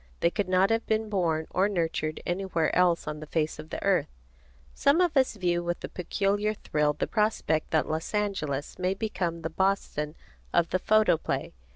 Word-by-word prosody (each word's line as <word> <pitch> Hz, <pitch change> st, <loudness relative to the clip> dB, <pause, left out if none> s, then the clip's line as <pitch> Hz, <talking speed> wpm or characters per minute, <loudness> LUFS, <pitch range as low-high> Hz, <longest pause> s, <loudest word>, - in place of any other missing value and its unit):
They 170 Hz, -, +3 dB
could 200 Hz, -1 st, -2 dB
not 185 Hz, +3 st, +4 dB
have 225 Hz, 0 st, +2 dB
been 220 Hz, 0 st, 0 dB
born 165 Hz, -6 st, 0 dB
or 195 Hz, +3 st, +2 dB
nurtured 160 Hz, -4 st, -1 dB
anywhere 175 Hz, -3 st, 0 dB
else 175 Hz, -3 st, +3 dB
on 150 Hz, 0 st, -4 dB
the 155 Hz, -, -8 dB
face 155 Hz, -1 st, -1 dB
of 155 Hz, +1 st, -9 dB
the -, -, -5 dB
earth. 195 Hz, -2 st, +2 dB, 0.7 s
Some 280 Hz, +4 st, +3 dB
of 350 Hz, -3 st, +2 dB
us 260 Hz, -4 st, +3 dB
view 175 Hz, -3 st, 0 dB
with 175 Hz, 0 st, -3 dB
a -, -, -4 dB
peculiar 205 Hz, +4 st, 0 dB
thrill 150 Hz, -6 st, 0 dB
the -, -, -2 dB
prospect 210 Hz, -8 st, 0 dB
that 155 Hz, -, +1 dB
Los 160 Hz, +6 st, -3 dB
Angeles 155 Hz, -10 st, -2 dB
may 185 Hz, +1 st, 0 dB
become 175 Hz, -7 st, -3 dB
the 160 Hz, -, -3 dB
Boston 160 Hz, -4 st, -1 dB, 0.4 s
of 170 Hz, -1 st, +3 dB
the 185 Hz, -, +2 dB
photoplay. 215 Hz, -5 st, +2 dB
180 Hz, 185 wpm, -28 LUFS, 160-205 Hz, 0.7 s, not